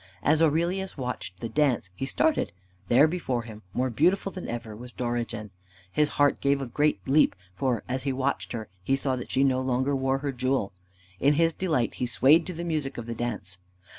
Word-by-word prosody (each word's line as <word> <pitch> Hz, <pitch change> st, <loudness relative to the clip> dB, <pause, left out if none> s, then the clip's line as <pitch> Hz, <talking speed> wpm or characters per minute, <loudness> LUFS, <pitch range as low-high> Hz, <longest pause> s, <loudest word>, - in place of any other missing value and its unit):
As 155 Hz, +2 st, +4 dB
Aurelius 170 Hz, +5 st, +1 dB
watched 125 Hz, -8 st, -5 dB
the 115 Hz, -, -2 dB
dance, 125 Hz, -6 st, +1 dB
he 135 Hz, +8 st, -4 dB
started. 315 Hz, -, +1 dB, 0.4 s
There, 135 Hz, +6 st, +6 dB
before 145 Hz, -8 st, -2 dB
him, 110 Hz, -2 st, -10 dB
more 125 Hz, +5 st, 0 dB
beautiful 180 Hz, -, +2 dB
than 185 Hz, -, -7 dB
ever, 115 Hz, -2 st, -5 dB
was 120 Hz, +2 st, -9 dB
Dorigen. 120 Hz, -3 st, -3 dB, 0.4 s
His 150 Hz, +5 st, +2 dB
heart 145 Hz, 0 st, +3 dB
gave 140 Hz, 0 st, +2 dB
a 135 Hz, -, -3 dB
great 145 Hz, +5 st, +1 dB
leap, 145 Hz, +3 st, +4 dB, 0.2 s
for, 125 Hz, +1 st, -1 dB
as 130 Hz, +1 st, -2 dB
he 135 Hz, +1 st, -1 dB
watched 135 Hz, +1 st, -1 dB
her, 110 Hz, -2 st, -4 dB, 0.2 s
he 135 Hz, -, +2 dB
saw 135 Hz, -1 st, 0 dB
that 125 Hz, -, -6 dB
she 135 Hz, -, +2 dB
no 130 Hz, -1 st, +2 dB
longer 130 Hz, +2 st, +1 dB
wore 135 Hz, 0 st, +1 dB
her 140 Hz, +1 st, -2 dB
jewel. 130 Hz, -5 st, -1 dB, 0.5 s
In 145 Hz, +2 st, +4 dB
his 165 Hz, +1 st, +3 dB
delight 155 Hz, -11 st, 0 dB
he 125 Hz, -, +1 dB
swayed 140 Hz, +7 st, +4 dB
to 180 Hz, -, -3 dB
the 170 Hz, -, -4 dB
music 155 Hz, -5 st, -2 dB
of 120 Hz, -, -5 dB
the 115 Hz, -, -4 dB
dance. 105 Hz, -6 st, -4 dB
130 Hz, 200 wpm, -27 LUFS, 120-150 Hz, 0.5 s, There